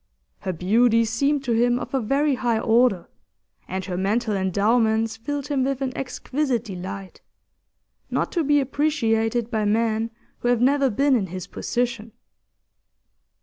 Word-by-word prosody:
Her 190 - -3
beauty 230 +6 +3
seemed 275 +6 0
to 250 - -2
him 240 +1 +3
of 250 - -6
a 270 - +2
very 280 +6 +1
high 240 -3 0
order, 225 -4 +2 0.6
and 190 0 -4
her 180 -2 -4
mental 210 +3 0
endowments 220 +4 +1
filled 285 +5 -5
him 275 -3 +1
with 270 0 -1
an 265 -2 -3
exquisite 265 -1 -2
delight, 190 -2 -7 0.9
not - - -1
to 340 - 0
be 290 0 +3
appreciated 240 -5 0
by 220 -2 0
men 220 +1 +1 0.3
who - - -2
have 245 -1 +3
never 275 +2 +3
been 275 +5 +2
in 205 -6 0
his 185 0 -6
position. 235 -3 -3
230 Hz, 150 wpm, -23 LUFS, 215-265 Hz, 0.9 s, beauty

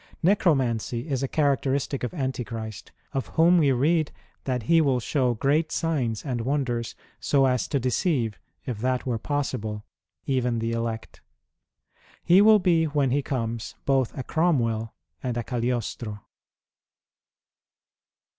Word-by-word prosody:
Necromancy 135 - +1
is 135 -4 -1
a 135 - 0
characteristic 140 -1 0
of 125 - -2
Antichrist, 120 - -5 0.2
of 135 -7 -2
whom 170 +2 +6
we 145 -4 +4
read, 155 +5 +2 0.2
" - - -38
that 125 -3 -1
he 165 +8 +4
will 135 -4 +2
show 125 0 0
great 150 +7 +1
signs 135 -10 -1
and 125 -4 -2
wonders 125 -3 -1 0.2
so 135 -1 +3
as 125 -3 +1
to 140 - 0
deceive, 125 - 0 0.3
if 120 -5 -4
that 130 +2 0
were 120 -3 -1
possible, 110 -7 -3 0.4
even 125 -3 0
the 115 0 -1
elect." 115 -1 -4 1.0
He 180 +3 +6
will 215 +1 +7
be 175 -4 +3
when 145 -4 +1
he 145 +2 +2
comes 115 -4 -3
both 135 -3 +1
a 130 - -3
Cromwell 115 -9 +1 0.3
and 125 -2 -2
a 120 - -1
Cagliostro. 120 -3 -3
130 Hz, 135 wpm, -25 LUFS, 115-145 Hz, 1.0 s, will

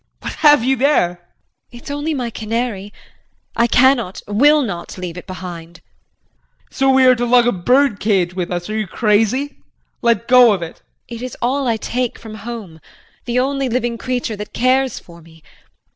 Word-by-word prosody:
What - - -5
have 295 -5 +6
you 265 +2 +2
there? 235 -10 +2
JULIE. - - -31 0.6
It's 260 - -9
only 290 +2 -2
my 245 -3 -3
canary. 220 -2 -3 0.6
I 235 - +3
cannot, 245 -6 +2
will 290 +9 +4
not, 185 -7 -6
leave 180 -2 -6
it 180 - -10
behind. 175 -3 -8
JEAN. - - -28
So 270 -1 +1
we 265 -1 +5
are 255 - +7
to 245 -1 -2
lug 240 0 +4
a 245 - +3
bird 245 +4 +2
cage 190 -4 +1
with 180 -2 -3
us. 175 -1 -4
Are - - -3
you 215 -2 -2
crazy? 225 +8 0 0.4
Let 235 -1 +1
go 245 -3 +6
of 185 -4 -3
it. 165 - -8 0.3
JULIE. 235 -1 -8
It - - -11
is 255 - -7
all 265 +3 -1
I 230 -2 +1
take 245 +2 -3
from 220 -2 -11
home. 215 -6 -8 0.5
The 240 0 -2
only 270 +1 0
living 240 -1 -2
creature 245 -3 -3
that 210 0 -8
cares 260 +1 +1
for 170 -1 -13
me. 160 -1 -19
235 Hz, 190 wpm, -18 LUFS, 195-255 Hz, 0.6 s, are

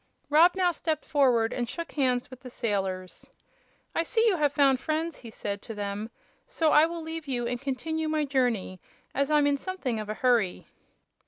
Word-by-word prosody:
Rob 335 +5 +6
now 365 -2 +3
stepped 315 -1 -2
forward 250 -6 +3
and 240 -2 -2
shook 335 +4 -5
hands 255 -3 0
with 255 - -10
the 255 - -10
sailors. 195 -6 -3 0.6
"I - - +1
see 450 +7 +1
you 415 -6 +3
have 295 -3 +2
found 275 -3 +3
friends," 315 +3 -2
he 235 - -11
said 200 -2 -5
to 225 - -8
them, 205 +1 -4 0.4
"so 320 -2 +1
I 305 +2 +6
will 335 -1 -6
leave 320 -1 -6
you 245 -3 -1
and 245 0 -3
continue 310 +4 -2
my 310 -1 +1
journey, 245 -9 0 0.3
as 280 +1 0
I'm 300 -1 +4
in 285 0 +2
something 275 - -3
of 210 -1 -6
a 215 - -2
hurry." 235 -8 +1
270 Hz, 190 wpm, -28 LUFS, 230-315 Hz, 0.6 s, Rob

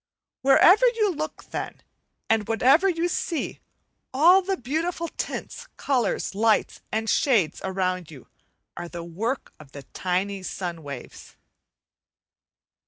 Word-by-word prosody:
Wherever 365 - +6
you 450 -4 +2
look, 310 0 -5
then, - - -5 0.4
and 220 -2 +1
whatever 265 - +4
you 340 -1 0
see, 340 -2 -3 0.5
all 345 +8 +6
the 385 0 -2
beautiful 330 +6 -2
tints, - - -6
colours, 255 -7 0
lights, 220 +2 +1
and 220 +1 -1
shades 220 - +2
around 185 -2 -2
you 140 -6 -13 0.5
are 175 - -6
the 170 -1 -7
work 220 +10 -4
of 145 -3 -15
the 140 - -9
tiny 190 +2 -1
sun 175 -2 -5
waves. 140 -4 -10
225 Hz, 120 wpm, -25 LUFS, -, 0.5 s, Wherever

